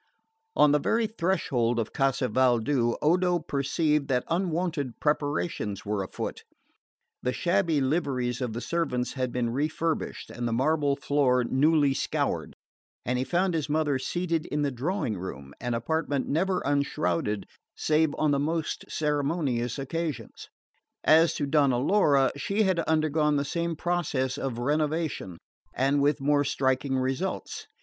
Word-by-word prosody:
On 150 Hz, -, +5 dB
the 150 Hz, -, +4 dB
very 230 Hz, +9 st, +1 dB
threshold 165 Hz, -, 0 dB
of 115 Hz, -2 st, -2 dB
Casa 135 Hz, -1 st, +1 dB
Valdu, 120 Hz, -1 st, +2 dB
Odo 180 Hz, +3 st, +3 dB
perceived 150 Hz, 0 st, 0 dB
that 125 Hz, -2 st, +1 dB
unwonted 165 Hz, -6 st, -1 dB
preparations 145 Hz, -, -1 dB
were 105 Hz, -1 st, -1 dB
afoot. 95 Hz, -, -5 dB, 0.8 s
The 125 Hz, -, 0 dB
shabby 170 Hz, -3 st, +1 dB
liveries 130 Hz, -4 st, -1 dB
of 125 Hz, -3 st, -2 dB
the 120 Hz, -, -4 dB
servants 140 Hz, -8 st, -1 dB
had 130 Hz, -2 st, -2 dB
been 120 Hz, -1 st, -1 dB
refurbished 155 Hz, +5 st, -2 dB
and 120 Hz, 0 st, -3 dB
the 115 Hz, -, -1 dB
marble 145 Hz, +3 st, +2 dB
floor 140 Hz, -3 st, +2 dB
newly 145 Hz, +3 st, +3 dB
scoured; -, -, -2 dB, 0.5 s
and 125 Hz, +2 st, 0 dB
he -, -, +1 dB
found 180 Hz, +5 st, +1 dB
his 155 Hz, -3 st, -2 dB
mother 150 Hz, -3 st, +1 dB
seated 170 Hz, +2 st, -2 dB
in 150 Hz, 0 st, -1 dB
the 140 Hz, -, 0 dB
drawing 130 Hz, -, -2 dB
room, 70 Hz, -6 st, -7 dB
an 120 Hz, -1 st, -1 dB
apartment 145 Hz, +3 st, -1 dB
never 185 Hz, +6 st, +1 dB
unshrouded 105 Hz, -8 st, 0 dB, 0.3 s
save 155 Hz, -1 st, +1 dB
on 155 Hz, -1 st, +2 dB
the 140 Hz, -, +2 dB
most 160 Hz, +2 st, -2 dB
ceremonious 145 Hz, -5 st, -1 dB
occasions. 140 Hz, -4 st, -4 dB, 0.5 s
As 160 Hz, +2 st, +5 dB
to 145 Hz, -, -1 dB
Donna 140 Hz, -3 st, +3 dB
Laura, 145 Hz, -2 st, +3 dB
she 200 Hz, +10 st, 0 dB
had 190 Hz, -3 st, +1 dB
undergone 155 Hz, -1 st, +2 dB
the 140 Hz, 0 st, 0 dB
same 170 Hz, +3 st, -2 dB
process 150 Hz, -7 st, -1 dB
of 130 Hz, -4 st, -3 dB
renovation, 150 Hz, -, -1 dB, 0.4 s
and 140 Hz, +2 st, +2 dB
with 145 Hz, +2 st, +2 dB
more 145 Hz, +1 st, +3 dB
striking 130 Hz, 0 st, 0 dB
results. 130 Hz, +8 st, -3 dB
145 Hz, 140 wpm, -27 LUFS, 125-160 Hz, 0.8 s, On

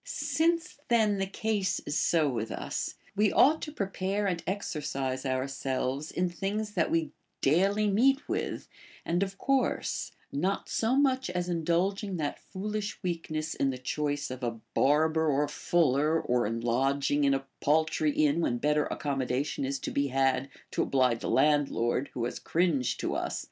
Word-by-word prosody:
Since 330 Hz, +3 st, 0 dB
then 215 Hz, -4 st, +3 dB
the 195 Hz, -, 0 dB
case 200 Hz, -1 st, -1 dB
is 145 Hz, -, -4 dB
so 160 Hz, 0 st, +3 dB
with 115 Hz, -4 st, -2 dB
us, -, -, -4 dB, 0.2 s
we 210 Hz, 0 st, +3 dB
ought 310 Hz, +4 st, +5 dB
to 300 Hz, -, -5 dB
prepare 195 Hz, -3 st, -2 dB
and 180 Hz, -4 st, -1 dB
exercise 140 Hz, -8 st, -2 dB
ourselves 135 Hz, +2 st, -2 dB
in 180 Hz, +1 st, 0 dB
things 200 Hz, +5 st, -3 dB
that 175 Hz, -5 st, +1 dB
we 165 Hz, -1 st, 0 dB, 0.3 s
daily 195 Hz, +9 st, +3 dB
meet 265 Hz, +8 st, +3 dB
with -, -, -3 dB, 0.4 s
and 175 Hz, +2 st, 0 dB
of 195 Hz, 0 st, -2 dB
course, 270 Hz, -1 st, 0 dB, 0.2 s
not 180 Hz, +8 st, -1 dB
so 230 Hz, +3 st, +1 dB
much 265 Hz, -4 st, +2 dB
as 180 Hz, 0 st, -2 dB
indulging 180 Hz, +4 st, 0 dB
that 150 Hz, -3 st, -2 dB
foolish 210 Hz, +2 st, -4 dB
weakness 165 Hz, -3 st, -2 dB
in 135 Hz, -, +1 dB
the 130 Hz, -, -3 dB
choice 145 Hz, +2 st, -2 dB
of 130 Hz, 0 st, -6 dB
a 115 Hz, -1 st, -2 dB
bar 150 Hz, +3 st, +4 dB
ber 160 Hz, 0 st, 0 dB
or 145 Hz, +1 st, +2 dB
fuller, 155 Hz, 0 st, +2 dB
or 120 Hz, -6 st, +1 dB
in 115 Hz, +1 st, -3 dB
lodging 135 Hz, +4 st, +1 dB
in 140 Hz, -1 st, +4 dB
a 135 Hz, 0 st, -4 dB
paltry 155 Hz, +1 st, +2 dB
inn 150 Hz, +1 st, +2 dB
Avhen 120 Hz, -7 st, 0 dB
better 150 Hz, +2 st, +2 dB
accommodation 135 Hz, -1 st, -2 dB
is 135 Hz, +1 st, -1 dB
to -, -, -5 dB
be 140 Hz, 0 st, +1 dB
had, 135 Hz, 0 st, +1 dB, 0.2 s
to -, -, 0 dB
oblige 125 Hz, -4 st, +2 dB
the -, -, -4 dB
landlord 140 Hz, -4 st, +2 dB
who 120 Hz, -, -1 dB
has 120 Hz, -, -4 dB
cringed 160 Hz, -7 st, +1 dB
to -, -, -1 dB
us. -, -, -2 dB
155 Hz, 165 wpm, -29 LUFS, 135-195 Hz, 0.4 s, ought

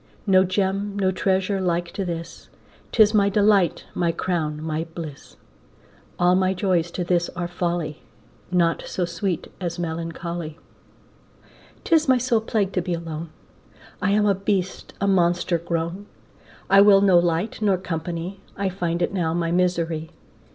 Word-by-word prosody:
No 190 Hz, -2 st, +5 dB
Gem, 195 Hz, +2 st, -1 dB
no 190 Hz, -2 st, +2 dB
treasure 190 Hz, +1 st, 0 dB
like 175 Hz, -1 st, -1 dB
to 195 Hz, -, -3 dB
this, 170 Hz, -2 st, -6 dB, 0.4 s
'Tis 215 Hz, -2 st, +5 dB
my 200 Hz, -2 st, +4 dB
delight, 200 Hz, -4 st, +3 dB
my 170 Hz, -1 st, +1 dB
crown, 160 Hz, -4 st, -2 dB
my 160 Hz, +1 st, -3 dB
bliss. 155 Hz, -5 st, -8 dB, 0.8 s
All 175 Hz, 0 st, +4 dB
my 185 Hz, +1 st, +2 dB
joys 180 Hz, -3 st, +1 dB
to 180 Hz, -, -2 dB
this 175 Hz, 0 st, +1 dB
are 175 Hz, -1 st, -2 dB
folly, 175 Hz, -3 st, -3 dB, 0.5 s
Naught 170 Hz, -2 st, +2 dB
so 180 Hz, -, -1 dB
sweet 175 Hz, 0 st, -3 dB
as 170 Hz, -1 st, -3 dB
melancholy. 165 Hz, -1 st, -4 dB, 1.3 s
'Tis 320 Hz, -3 st, +3 dB
my 260 Hz, -, +6 dB
sole 240 Hz, -2 st, +1 dB
plague 210 Hz, -3 st, 0 dB
to 180 Hz, -, +1 dB
be 175 Hz, 0 st, -2 dB
alone, 165 Hz, -1 st, -6 dB, 0.7 s
I 185 Hz, -, +1 dB
am 210 Hz, +1 st, +3 dB
a 200 Hz, -, +4 dB
beast, 195 Hz, -1 st, -2 dB
a 200 Hz, -, 0 dB
monster 175 Hz, -2 st, +2 dB
grown, 170 Hz, +4 st, -3 dB, 0.6 s
I 195 Hz, 0 st, +7 dB
will 200 Hz, -1 st, +7 dB
no 190 Hz, -3 st, +6 dB
light 175 Hz, +6 st, -1 dB
nor 200 Hz, -3 st, +3 dB
company, 175 Hz, +1 st, -4 dB, 0.2 s
I 195 Hz, 0 st, 0 dB
find 175 Hz, -2 st, -2 dB
it 175 Hz, -, -1 dB
now 165 Hz, -4 st, 0 dB
my 170 Hz, -1 st, 0 dB
misery. 170 Hz, -3 st, 0 dB
180 Hz, 150 wpm, -23 LUFS, 170-195 Hz, 1.3 s, I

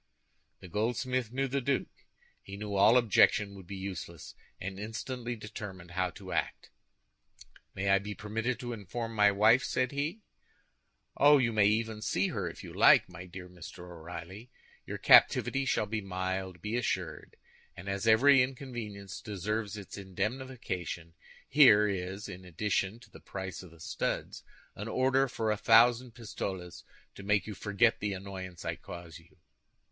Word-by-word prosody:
The -, -, -10 dB
goldsmith 120 Hz, +4 st, -1 dB
knew 135 Hz, +2 st, 0 dB
the 140 Hz, +1 st, -1 dB
duke. 135 Hz, +1 st, -2 dB, 0.3 s
He 100 Hz, 0 st, -9 dB
knew 105 Hz, 0 st, -5 dB
all 105 Hz, +5 st, +6 dB
objection 105 Hz, -3 st, +4 dB
would 95 Hz, -3 st, -12 dB
be 100 Hz, -, -6 dB
useless, 90 Hz, -4 st, -7 dB, 0.3 s
and 95 Hz, +1 st, -6 dB
instantly 120 Hz, +3 st, -4 dB
determined 100 Hz, -5 st, -8 dB
how 95 Hz, 0 st, 0 dB
to -, -, -9 dB
act. -, -, -3 dB, 1.0 s
"May 95 Hz, +1 st, -2 dB
I 100 Hz, 0 st, +5 dB
be 105 Hz, +1 st, -6 dB
permitted 115 Hz, +3 st, -2 dB
to 120 Hz, -1 st, -4 dB
inform 115 Hz, +2 st, -5 dB
my 105 Hz, -2 st, +5 dB
wife?" 110 Hz, +6 st, +5 dB
said 130 Hz, 0 st, 0 dB
he. 150 Hz, +9 st, -3 dB, 1.0 s
"Oh, 145 Hz, +1 st, +7 dB
you 120 Hz, -4 st, +1 dB
may 105 Hz, -2 st, +5 dB
even 110 Hz, 0 st, 0 dB
see 95 Hz, -3 st, 0 dB
her -, -, -2 dB
if -, -, -11 dB
you -, -, -9 dB
like, -, -, +6 dB
my 90 Hz, 0 st, -10 dB
dear 90 Hz, +1 st, -9 dB
Mr. 90 Hz, 0 st, -11 dB
O'Reilly. 85 Hz, +7 st, -9 dB, 0.4 s
Your -, -, -4 dB
captivity 135 Hz, 0 st, +5 dB
shall 110 Hz, -, +1 dB
be 110 Hz, +1 st, -3 dB
mild, 95 Hz, -1 st, -4 dB
be 105 Hz, +2 st, -2 dB
assured; 95 Hz, -8 st, -3 dB, 0.4 s
and 90 Hz, -, -9 dB
as 100 Hz, +2 st, -2 dB
every 135 Hz, +5 st, +7 dB
inconvenience 120 Hz, -7 st, -5 dB
deserves 105 Hz, +1 st, -3 dB
its 100 Hz, 0 st, -8 dB
indemnification, 95 Hz, -4 st, -4 dB, 0.3 s
here 110 Hz, -8 st, +7 dB
is, 95 Hz, +1 st, -4 dB
in 95 Hz, -2 st, -9 dB
addition 95 Hz, +4 st, -1 dB
to -, -, -17 dB
the -, -, -13 dB
price 95 Hz, -1 st, -6 dB
of 90 Hz, -, -12 dB
the 85 Hz, 0 st, -18 dB
studs, -, -, -3 dB, 0.3 s
an 105 Hz, -, -6 dB
order 130 Hz, +3 st, +2 dB
for 110 Hz, -3 st, -1 dB
a 105 Hz, -, 0 dB
thousand 120 Hz, +2 st, +5 dB
pistoles, 95 Hz, -6 st, -6 dB, 0.3 s
to -, -, -11 dB
make 105 Hz, +1 st, +1 dB
you 110 Hz, -, -6 dB
forget 105 Hz, +4 st, +2 dB
the 105 Hz, -1 st, -2 dB
annoyance 95 Hz, -2 st, -7 dB
I -, -, -2 dB
cause 85 Hz, -3 st, -10 dB
you." -, -, -23 dB
105 Hz, 160 wpm, -31 LUFS, 95-120 Hz, 1.0 s, Oh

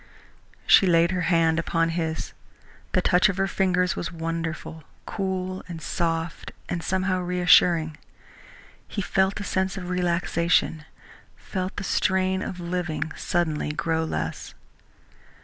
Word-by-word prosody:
She 195 Hz, -, +6 dB
laid 170 Hz, 0 st, +4 dB
her 180 Hz, -2 st, -1 dB
hand 165 Hz, -2 st, +3 dB
upon 165 Hz, 0 st, +1 dB
his. 165 Hz, -1 st, -3 dB, 0.6 s
The -, -, +2 dB
touch 180 Hz, +3 st, +4 dB
of 195 Hz, -, -2 dB
her 195 Hz, -, +2 dB
fingers 185 Hz, -2 st, +1 dB
was 170 Hz, -, -4 dB
wonderful, 165 Hz, -1 st, -4 dB, 0.2 s
cool 185 Hz, -2 st, -3 dB
and 170 Hz, -2 st, -6 dB
soft 165 Hz, 0 st, -2 dB, 0.2 s
and 170 Hz, -, -3 dB
somehow 185 Hz, +1 st, 0 dB
reassuring. 175 Hz, -3 st, +4 dB, 0.9 s
He 200 Hz, -, -3 dB
felt 190 Hz, +2 st, +1 dB
a -, -, -4 dB
sense 190 Hz, -1 st, -1 dB
of 180 Hz, -1 st, -5 dB
relaxation, 170 Hz, -3 st, +1 dB, 0.5 s
felt 185 Hz, -1 st, -5 dB
the 205 Hz, -, -4 dB
strain 190 Hz, 0 st, +1 dB
of 180 Hz, -, -5 dB
living 175 Hz, -2 st, -3 dB
suddenly 155 Hz, -4 st, -1 dB
grow 160 Hz, +1 st, 0 dB
less. 80 Hz, -, -4 dB
175 Hz, 130 wpm, -25 LUFS, 165-185 Hz, 0.9 s, She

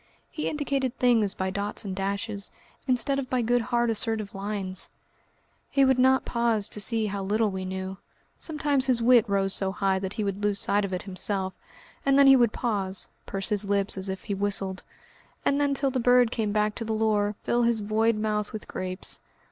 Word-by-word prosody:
He 305 Hz, -, -2 dB
indicated 275 Hz, -4 st, -2 dB
things 230 Hz, -5 st, +3 dB
by 190 Hz, 0 st, -2 dB
dots 200 Hz, +2 st, -3 dB
and 190 Hz, -2 st, -4 dB
dashes, 200 Hz, +1 st, -2 dB, 0.4 s
instead 275 Hz, +2 st, +1 dB
of 255 Hz, -2 st, -5 dB
by 250 Hz, -2 st, 0 dB
good 240 Hz, +1 st, +2 dB
hard 240 Hz, 0 st, +1 dB
assertive 220 Hz, -2 st, -1 dB
lines. 195 Hz, -2 st, -5 dB, 0.8 s
He 275 Hz, -1 st, +3 dB
would 265 Hz, -1 st, +3 dB
not 260 Hz, +1 st, +4 dB
pause 235 Hz, -3 st, +1 dB
to 210 Hz, -, -4 dB
see 225 Hz, +1 st, +1 dB
how 200 Hz, -1 st, -3 dB
little 210 Hz, +2 st, +1 dB
we 190 Hz, 0 st, -4 dB
knew. 190 Hz, 0 st, -5 dB, 0.4 s
Sometimes 290 Hz, -4 st, +1 dB
his 250 Hz, -2 st, +2 dB
wit 235 Hz, -2 st, +5 dB
rose 195 Hz, -1 st, +2 dB
so 190 Hz, -1 st, 0 dB
high 195 Hz, -1 st, 0 dB
that 190 Hz, 0 st, -4 dB
he 215 Hz, -, -2 dB
would 200 Hz, 0 st, -3 dB
lose 205 Hz, -1 st, +1 dB
sight 200 Hz, 0 st, +1 dB
of 195 Hz, -, -6 dB
it 180 Hz, -, -3 dB
himself, 190 Hz, 0 st, -1 dB, 0.5 s
and 275 Hz, 0 st, +3 dB
then 280 Hz, -, +7 dB
he 270 Hz, 0 st, +8 dB
would 240 Hz, -4 st, +4 dB
pause, 200 Hz, -6 st, -2 dB, 0.2 s
purse 195 Hz, +1 st, -2 dB
his 210 Hz, -1 st, 0 dB
lips 200 Hz, -1 st, +2 dB
as 190 Hz, 0 st, -5 dB
if 190 Hz, 0 st, -5 dB
he 205 Hz, -, -3 dB
whistled, 195 Hz, -1 st, +1 dB, 0.6 s
and 280 Hz, +1 st, +2 dB
then 285 Hz, -1 st, +1 dB
till 275 Hz, -1 st, 0 dB
the 260 Hz, -, -1 dB
bird 245 Hz, -1 st, +4 dB
came 220 Hz, -4 st, -1 dB
back 210 Hz, 0 st, +1 dB
to 230 Hz, -, -5 dB
the 220 Hz, 0 st, -2 dB
lure, 215 Hz, -1 st, +1 dB
fill 240 Hz, -, +1 dB
his 235 Hz, -2 st, +2 dB
void 220 Hz, +2 st, +1 dB
mouth 210 Hz, -1 st, -1 dB
with 215 Hz, -, -7 dB
grapes. 185 Hz, 0 st, -2 dB
215 Hz, 205 wpm, -26 LUFS, 195-245 Hz, 0.8 s, he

